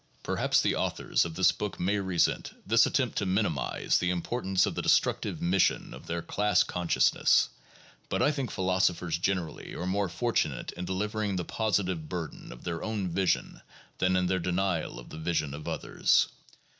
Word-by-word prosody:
Perhaps - - +1
the - - +2
authors - - 0
of 80 -1 -6
this 95 +1 +5
book 105 - -5
may 100 +3 +1
resent 95 -3 0
this 115 +3 +5
attempt 130 -6 0
to 100 - -1
minimize 95 -8 +1
the 90 - 0
importance 95 +2 0
of - - -2
the - - -2
destructive - - +1
mission 90 +2 +2
of - - -11
their 85 0 -3
"class 105 +2 +2
consciousness," 90 -1 +2 0.6
but - - -1
I 145 - +4
think 140 -4 -3
philosophers 90 -3 0
generally 90 -3 -2
are 90 - -4
more 100 +1 0
fortu 115 +7 +1
nate - - -6
in 90 +1 -6
delivering 105 +2 -2
the 90 -2 -2
positive 95 -7 -1
burden 85 -4 -6
of 60 - -11
their 85 -1 -3
own 105 -4 -2
vision 95 +2 0 0.4
than 95 0 +2
in 90 0 +2
their 95 +1 +1
denial 90 -1 -1
of - - -10
the 80 - -8
vision 80 -3 -1
of 75 +1 -8
others. - - +2
95 Hz, 175 wpm, -29 LUFS, 85-100 Hz, 0.6 s, this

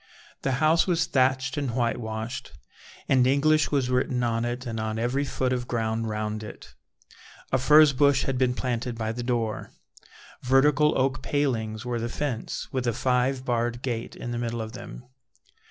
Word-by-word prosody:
The 135 - 0
house 155 +6 +3
was 170 -2 +2
thatched 130 0 +1
and 135 -5 -2
whitewashed, 115 -2 -3 0.5
and 130 -2 +4
English 155 +3 +3
was 135 -3 0
written 125 -1 +1
on 115 0 0
it 120 +2 -4
and 115 -2 -4
on 110 0 -2
every 125 +5 0
foot 130 -2 -1
of 120 -1 -3
ground 115 -1 -1
round 105 0 -3
it. 105 - -10 0.8
A 130 - +2
furze 150 +2 +6
bush 140 0 +3
had 135 - -1
been 125 -1 +2
planted 120 -2 -2
by 110 -1 -2
the 120 +2 -5
door. 120 -3 -2 0.7
Vertical 145 +3 +3
oak 130 0 0
palings 120 -6 -1
were 120 -1 -2
the 120 +1 -3
fence, 125 -4 -3
with 130 -2 -2
a 120 - +2
five 130 +2 0
barred 120 0 -1
gate 120 -3 -3
in 120 - -6
the 120 - -2
middle 120 -1 -3
of 110 -1 -5
them. 120 +1 -9
125 Hz, 170 wpm, -26 LUFS, 115-135 Hz, 0.8 s, furze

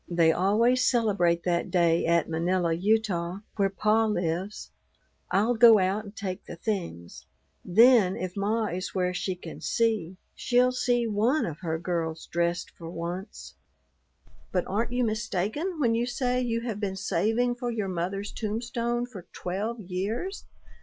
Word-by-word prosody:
They 170 -2 +4
always 225 +9 +3
celebrate 200 -9 +2
that 170 -1 0
day 170 -2 +2
at 170 -1 +3
Manila, 170 +1 0
Utah, 190 -1 0
where 195 -2 +2
pa 215 +3 +2
lives. 180 0 -2 0.6
I'll 210 +6 +2
go 230 -1 +8
out 195 +3 0
and 205 +1 -11
take 190 -2 -5
the - - -8
things. 170 - -5 0.4
Then 220 0 +5
if 185 -1 -4
ma 215 +3 0
is 185 -1 -4
where 180 -1 +1
she 185 +1 -2
can 180 - -10
see, 215 -6 0 0.2
she'll 250 0 +2
see 245 -1 +1
one 225 +7 +1
of 155 -3 -6
her 160 -3 -2
girls 165 -1 -3
dressed 170 +1 -1
for 165 -1 -10
once." 175 +3 -6 1.0
"But 180 -2 0
aren't 225 +5 -1
you 250 0 +1
mistaken 220 - -2
when 240 -5 +2
you 235 +1 0
say 250 0 0
you 230 -2 -1
have 230 -4 -4
been 195 -2 -2
saving 225 +5 +1
for 245 0 -4
your 220 -4 -2
mother's 190 +3 -3
tombstone 235 +2 -2
for 200 -8 -11
twelve 210 +6 -3
years? 210 - -4
200 Hz, 155 wpm, -27 LUFS, 175-230 Hz, 1.0 s, go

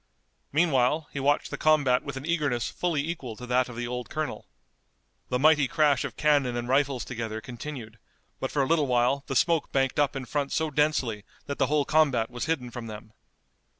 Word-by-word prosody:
Meanwhile 150 -1 +2
he 140 - -3
watched 145 +2 +1
the - - -5
combat 145 -5 +3
with - - -6
an 135 - -6
eagerness 145 -8 0
fully 160 -4 -1
equal 135 -9 -5
to 125 - -9
that 125 +1 +1
of 120 - -9
the 120 +1 -3
old 125 0 -5
colonel. 155 -1 -4 0.8
The 125 - +1
mighty 150 0 +4
crash 150 -4 +2
of - - -6
cannon 140 -5 +2
and 120 0 -3
rifles 135 -1 +1
together 115 -3 -4
continued, 120 -2 -8 0.4
but 130 - -2
for 140 - +1
a - - -1
little 155 -2 +2
while 125 +3 +2
the 135 - -3
smoke 165 +3 +2
banked 135 0 +1
up 145 0 +2
in 135 -1 -4
front 140 +1 -2
so 160 -1 0
densely 135 -8 0 0.2
that 140 - -5
the - - +3
whole 145 0 +1
combat 135 -7 +2
was 120 -1 -4
hidden 135 -7 -2
from 120 -2 -7
them. 110 0 -10
135 Hz, 200 wpm, -27 LUFS, 125-150 Hz, 0.8 s, mighty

